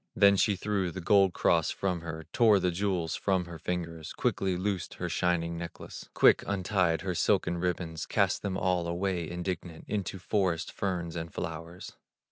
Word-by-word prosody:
Then 100 0 +6
she 100 +1 +3
threw 95 -1 -1
the 85 - -6
gold 95 +1 +4
cross 85 -2 +2
from 90 -3 -2
her, 80 -1 -6
Tore 110 -5 +5
the 90 -1 +1
jewels 90 -3 -1
from 95 -3 0
her 85 -2 -9
fingers, 85 -2 -4
Quickly 95 -2 0
loosed 95 -1 -2
her - - -3
shining 85 -1 0
necklace, 85 -1 -8
Quick - - +6
untied 95 -4 +1
her 95 -2 -2
silken 90 -1 +1
ribbons, 85 -2 -2
Cast - - +1
them 95 -2 -2
all 90 -3 0
away 85 -1 -1
indignant 85 -1 -5
Into 100 -2 -2
forest 95 -3 0
ferns 90 -4 -3
and 80 -1 -5
flowers. 80 +2 -6
90 Hz, 165 wpm, -29 LUFS, 85-95 Hz, -, Then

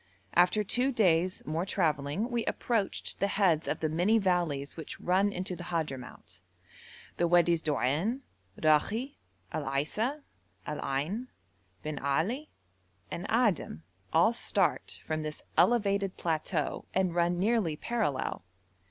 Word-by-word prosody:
After 180 +5 +4
two 250 +6 +2
days 185 -6 +2
more 160 +3 -1
travelling 165 - 0
we 235 -1 0
approached 225 -5 -1
the 200 - +2
heads 185 -6 +2
of - - -2
the 160 - +2
many 175 +8 +3
valleys 175 -8 0
which 160 -3 -7
run 190 +3 +2
into 185 -1 -4
the 175 - -8
Hadhramout; 145 -7 -5 0.8
the 175 - +2
Wadis 170 -1 +4
Doan, 155 - 0 0.4
Rakhi, 210 - +2 0.3
Al 155 - -3
Aisa, 215 - -1 0.4
Al 150 - -4
Ain, 165 - -2 0.6
Bin 150 -2 -4
Ali, 190 - -1 0.6
and 180 +4 -4
Adim 215 - +1 0.3
all 170 +8 +4
start - - 0
from 155 0 -2
this 155 0 -5
elevated 200 -1 +2
plateau 160 -1 -1
and 185 -2 +2
run 175 0 +2
nearly 200 -4 +1
parallel. 200 - -2
175 Hz, 125 wpm, -30 LUFS, 155-210 Hz, 0.8 s, After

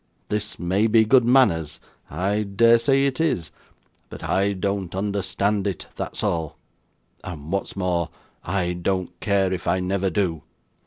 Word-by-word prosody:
This 105 0 -2
may 95 +5 +1
be 110 0 +5
good 125 +3 +5
manners 100 - +3 0.3
I 100 +3 0
dare 115 +3 +4
say 135 +2 +3
it 140 +2 0
is 90 - 0 0.6
but - - -9
I 100 +1 +1
don't 100 -1 -2
understand 100 +1 0
it, 95 - -4
that's - - -5
all; 80 -3 -1 0.7
and 80 -3 -7
what's 100 0 -2
more, 90 -3 -1 0.3
I 90 -1 -1
don't 90 +1 -2
care 95 -2 +1
if 90 - -5
I 95 - +2
never 95 +1 0
do. 90 -6 -1
100 Hz, 150 wpm, -23 LUFS, 90-105 Hz, 0.7 s, be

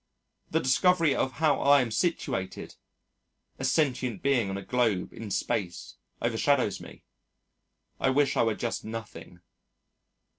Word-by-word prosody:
The 160 - +1
discovery 165 +4 +3
of 130 - -1
how 155 -4 +2
I 140 0 +5
am 120 -3 -3
situated 110 - -2 0.8
a - - -5
sentient 130 - 0
being 125 -7 +2
on 95 - -3
a 100 - -7
globe 110 -4 0
in 110 -2 -8
space 90 -2 -3 0.3
overshadows 120 -1 +1
me. - - -13 1.0
I - - +2
wish 140 +2 +2
I - - +3
were 115 -2 +1
just 120 +1 -3
nothing. 110 -5 -8
125 Hz, 135 wpm, -28 LUFS, 110-140 Hz, 1.0 s, I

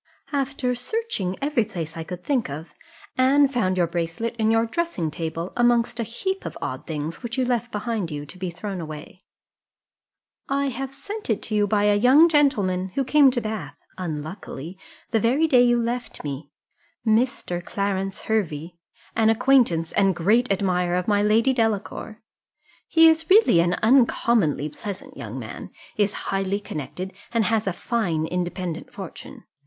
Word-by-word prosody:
"After 275 -3 -1
searching 250 - -2
every 280 -5 +2
place 170 -7 -6
I 165 - -4
could 180 +2 -8
think 260 - 0
of, 150 +2 -7 0.5
Anne 275 +2 +5
found 220 -9 0
your 175 - +3
bracelet 170 +7 -3
in 220 -1 +2
your 225 +1 +3
dressing 230 - -2
table, 165 +3 -4
amongst 240 0 +2
a - - +1
heap 380 - -3
of - - -6
odd - - -5
things, 155 0 -4
which 235 0 -5
you 260 - +2
left 240 -1 -1
behind 210 -4 -2
you 145 -2 -5
to 185 +6 -13
be 185 -1 -2
thrown 185 +2 -5
away: 155 +3 -9 1.3
I 275 0 +1
have 265 +2 -4
sent 405 - -7
it 220 - 0
to 220 - -6
you 205 -1 +3
by 205 0 +2
a 210 0 +4
young 260 +10 +6
gentleman, 205 - +2
who 275 - +1
came 285 +1 +5
to 250 -1 -1
Bath 215 -11 -5 0.2
(unluckily) 160 -1 -6 0.4
the 225 - +3
very 255 +9 +3
day 255 -6 +5
you 240 -1 +4
left 240 +1 -3
me 145 0 -5 0.6
Mr. 220 -6 +1
Clarence 195 0 -2
Hervey 170 -6 -2 0.4
an 220 -1 +4
acquaintance, 225 -9 +3
and 195 -2 +2
great 215 +7 +2
admirer 180 -3 +1
of 180 0 -1
my 205 -1 +3
Lady 225 +5 +3
Delacour. 220 -1 -2 0.6
He 325 0 +6
is 320 0 +3
really 390 - +6
an 175 +1 +2
uncommonly 230 - +3
pleasant 190 +6 -8
young - - -7
man, - - -7 0.3
is 205 -1 +2 0.2
highly 195 +1 0
connected, 185 +1 -6 0.2
and 230 -2 +2
has 225 -2 +1
a - - +2
fine 175 -6 -1
independent 175 -1 -4
fortune. 190 -4 -9
210 Hz, 165 wpm, -24 LUFS, 175-245 Hz, 1.3 s, young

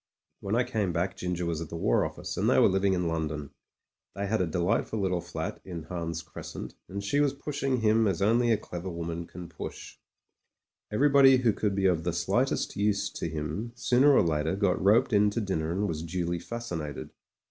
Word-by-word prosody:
When 100 +2 -2
I 120 - +3
came 110 -7 -1
back 90 +3 -1
Ginger 90 -1 -3
was 85 -1 -2
at 85 - -6
the - - -6
War 70 -7 +2
Office, - - -5
and - - +1
they - - +4
were - - +7
living 95 0 +2
in 90 -2 0
London. 75 -3 -3 0.6
They 100 - -2
had 110 +1 0
a 90 - +1
delight 90 +7 0
ful 110 - -3
little 90 -3 0
fl^t - - -5
in 85 -4 -7
Hans 85 0 -4
Crescent, 80 - -8 0.2
and 100 +1 -5
she 140 +8 +1
was 145 -1 +2
pushing 140 -3 -2
him 110 0 +4
as 95 -3 0
only 115 +4 +3
a 110 - +4
clever 90 -2 -6
woman 85 0 -4
can 90 -1 -9
push. 80 -2 -8 0.9
Everybody 135 +2 +6
who 120 -4 +2
could 100 -1 -1
be 95 -1 0
of 90 -4 +2
the 85 0 -1
slightest 100 +10 0
use 100 0 0
to 85 - -4
him 80 +9 -4
sooner 125 +4 +4
or - - +5
later 80 +1 0
got 95 -4 +1
roped 115 +5 +4
in 105 0 +5
to 105 - -2
dinner 85 -7 -1
and 100 +4 0
was 80 -3 -3
duly 85 +1 -2
fascinated. 85 - -5
95 Hz, 205 wpm, -28 LUFS, 85-110 Hz, 0.9 s, were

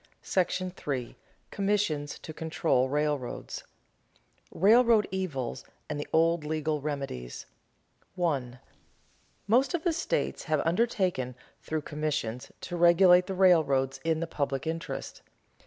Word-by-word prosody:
§ 185 -1 -1
III. 120 -2 -8 0.4
COMMISSIONS 195 -8 0
TO 155 - -9
CONTROL 155 -5 0
RAILROADS 145 -3 -2
[Sidenote: - - -6 1.0
Railroad 225 0 +6
evils 140 -10 -3 0.2
and 150 -1 -4
the 145 - -4
old 165 0 +3
legal 155 0 -1
remedies] 135 - -5 0.7
1. 140 -9 -1 0.9
_Most 255 - +3
of 330 - -3
the 345 - +2
states - - -2
have 155 -3 +1
undertaken, 180 - 0 0.3
through 155 -1 -3
commissions, 150 -6 -3
to 175 - -5
regulate 175 +1 +6
the 190 - -3
railroads 155 -8 +3
in 160 0 0
the - - 0
public 140 -4 -2
interest. 165 +1 -5
160 Hz, 120 wpm, -29 LUFS, 145-185 Hz, 1.0 s, Railroad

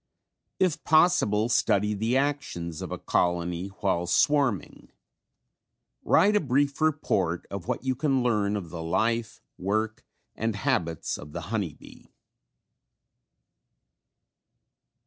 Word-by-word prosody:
If 180 -5 +1
possible 155 - +3
study 105 -3 +2
the 110 +5 0
actions 135 - -2
of - - -6
a - - -3
colony 90 +1 0
while 95 -3 -1
swarming. 140 - +1 1.1
Write 210 +2 +4
a - - +5
brief 140 0 0
report 100 - 0
of 100 -3 -6
what - - -2
you 130 -1 +1
can 135 -1 +1
learn 105 -4 +1
of 90 -6 -5
the 85 -1 -6
life, 110 +7 -1 0.2
work 110 +3 -1 0.3
and 110 -1 -2
habits 85 -5 -1
of 75 0 -11
the 85 - -4
honey 95 -9 -1
bee. - - -16
105 Hz, 115 wpm, -27 LUFS, 90-135 Hz, 1.1 s, a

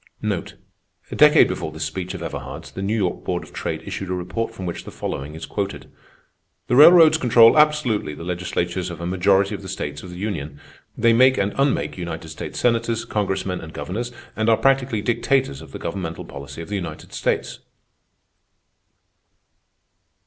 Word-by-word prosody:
A - - -4
decade - - +7
before 80 - -4
this 80 0 -5
speech 90 +3 -4
of - - -6
Everhard's, - - -7
the 95 - -6
New 100 +3 0
York 95 -5 -1
Board - - -2
of - - -15
Trade - - -4
issued 95 - -5
a 90 - -1
report 90 +6 -3
from 95 -5 -8
which 85 - -4
the - - -9
following 70 +3 -5
is 80 - -7
quoted: 100 -1 -4 0.8
"_The - - +1
railroads 160 +2 +8
control 115 -3 +6
absolutely 150 - +2
the 85 - -9
legislatures 90 0 -2
of 85 -2 -7
a 85 - -5
majority 95 +2 +2
of 100 - -5
the 95 - -9
states 75 -5 -5
of 90 - -10
the 90 - -9
Union; 80 -8 -4 0.4
they 115 0 +4
make 130 +2 +5
and 100 0 0
unmake 135 -8 0
United 80 -2 -5
States 80 - -7
Senators, 115 -1 +1
congressmen, 95 -3 -2
and 80 0 -10
governors, 105 +12 -4 0.2
and 110 +1 +1
are 110 - +5
practically 130 -5 +1
dictators 120 - 0
of - - -12
the - - -6
governmental 85 -1 -5
policy 70 +3 -8
of - - -12
the 105 - -2
United 85 -5 -6
States. - - -2
95 Hz, 175 wpm, -22 LUFS, 85-115 Hz, 0.8 s, railroads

